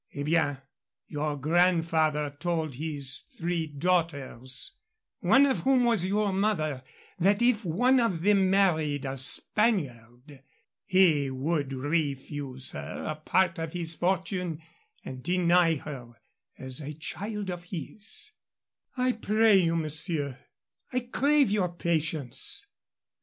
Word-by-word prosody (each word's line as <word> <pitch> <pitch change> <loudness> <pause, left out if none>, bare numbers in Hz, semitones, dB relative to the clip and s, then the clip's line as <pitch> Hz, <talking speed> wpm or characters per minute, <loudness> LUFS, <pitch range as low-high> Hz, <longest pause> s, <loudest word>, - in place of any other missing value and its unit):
Eh 140 - -3
bien. 150 -2 +1 0.5
Your 150 -1 -3
grandfather 160 -2 +1
told 165 -4 -2
his 140 -1 +2 0.2
three 170 -1 -2
daughters 150 - -2 0.4
one 275 +1 +5
of 270 -2 0
whom 260 -2 +2
was 225 -7 +2
your 205 0 0
mother 160 -9 -1 0.4
that 200 +6 +2
if 240 -3 +2
one 245 +10 +2
of 190 -9 -1
them 195 -2 +3
married 160 -7 +1
a 135 0 -3
Spaniard 135 - +2 0.4
he 170 -8 +3
would 140 +2 -2
refuse 140 -2 -2
her 70 0 -7
a 155 - -3
part 170 +3 0
of 160 -1 -5
his 170 -2 +2
fortune 180 -2 -2 0.5
and 130 -1 -8
deny 175 0 +2
her 130 -5 -9 0.4
as 130 +2 -4
a 150 +1 -6
child 200 +5 -4
of 175 0 -8
his 185 +5 -5 0.3
" - - -64
"I 255 0 +2
pray 220 -2 +3
you, 165 -3 +2
monsieur 155 -4 -1 0.3
" - - -45
"I 255 0 -1
crave 275 +1 +2
your 190 -4 0
patience. 155 -6 0
165 Hz, 125 wpm, -27 LUFS, 145-195 Hz, 0.5 s, one